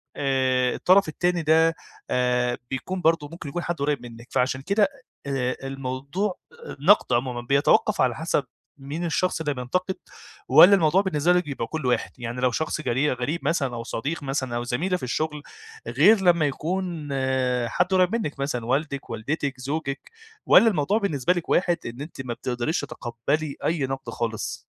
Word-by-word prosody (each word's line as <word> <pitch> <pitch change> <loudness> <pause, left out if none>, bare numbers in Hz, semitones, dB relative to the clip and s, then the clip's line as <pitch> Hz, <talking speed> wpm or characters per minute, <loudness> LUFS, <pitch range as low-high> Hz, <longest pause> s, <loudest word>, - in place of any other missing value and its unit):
آآ 130 -2 +1
الطرف 190 +1 +4
التاني 175 +2 0
ده 160 +1 +4 0.3
آآ 125 -1 +1
بيكون 180 +8 -4
برضه 160 -3 +2
ممكن 165 -3 -7
يكون 175 +5 -4
حد 175 - -2
قريّب 145 -3 -1
منِك، 115 0 -11
فعشان 130 +1 0
كده 200 +8 +2
أ - - +5 0.4
آآ 130 -2 -1
الموضوع 135 +9 -3 0.4
النقد 185 +9 +4
عمومًا 120 0 0
بيَتَوقّف 140 +4 +2
على 125 -3 +2
حسب 160 -1 0 0.3
مين 145 +5 -5
الشخص 175 +2 0
اللي 145 -2 -1
بينتقد، 180 +9 -2 0.5
والّا 200 +3 +8
الموضوع 175 0 +3
بالنسبة 175 -3 +2
لِك 180 0 +2
بيبقى 135 -5 -4
كله 155 -5 -2
واحد؟ 125 - 0
يعني 120 0 -5
لو 130 -1 +3
شخص 155 +4 -2
غري 140 +1 +1
غريب 130 +7 -2
مثلًا، 140 -6 0
أو 115 - -5
صديق 145 +8 -4
مثلًا، 135 -3 -2
أو 120 - -2
زميلة 165 +10 -1
في - - -13
الشغل، 150 +4 -2 0.4
غير 215 -1 +5
لما 170 -4 +4
يكون 165 +1 -3 0.6
حد 180 +9 +1
قريب 185 +3 +3
منِك 150 -12 -3
مثلًا، 130 -4 -2
والدِك، 140 +2 -2
والدتِك، 135 +4 -3
زوجِك، 140 +1 -4 0.3
والّا 230 - +7
الموضوع 195 +1 +1
بالنسبة 180 - +1
لِك 175 -2 -5
واحد 175 -1 +2
إن 120 +3 -6
أنتِ 150 -2 -7
ما 120 - -3
بتقدريش 125 +6 -2
تَتَقبَّلي 140 +6 -3
أي 160 -4 +1
نقد 135 -2 -5
خالص؟ 115 -1 -3
145 Hz, 165 wpm, -24 LUFS, 125-170 Hz, 0.6 s, والّا